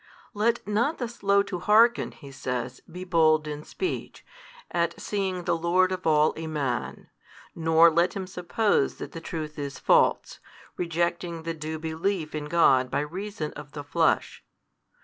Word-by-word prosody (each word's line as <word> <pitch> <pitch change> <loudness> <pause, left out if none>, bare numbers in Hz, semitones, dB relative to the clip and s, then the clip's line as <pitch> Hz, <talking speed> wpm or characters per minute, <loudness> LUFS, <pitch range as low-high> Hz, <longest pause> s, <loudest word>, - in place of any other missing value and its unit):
Let 230 +2 0
not 235 +9 +1
the 245 - -3
slow 200 -4 +2
to 185 -3 -5
hearken 225 +5 +4
(he 140 -3 -13
says) 125 -1 -4
be 180 +2 -7
bold 160 -4 +3
in 150 0 -5
speech, 370 - -5 0.5
at 170 -1 -1
seeing 190 -3 -2
the - - +1
Lord 180 +3 +2
of 185 -2 -3
all 155 -1 +4
a 160 0 -5
Man, 140 -7 -3 0.4
nor 165 0 +5
let 170 +3 +2
him 195 -1 -3
suppose 185 -2 0
that - - -8
the 165 - -8
Truth 155 -2 -6
is 140 -1 -5
false, - - +2 0.4
rejecting 170 -1 -2
the 165 0 -3
due 160 0 -5
belief 160 +1 -2
in 150 -1 -4
God 135 -5 +4
by 140 +2 0
reason 175 0 -5
of 145 0 -10
the 145 -1 -6
Flesh. 160 +3 0
165 Hz, 160 wpm, -26 LUFS, 155-185 Hz, 0.5 s, nor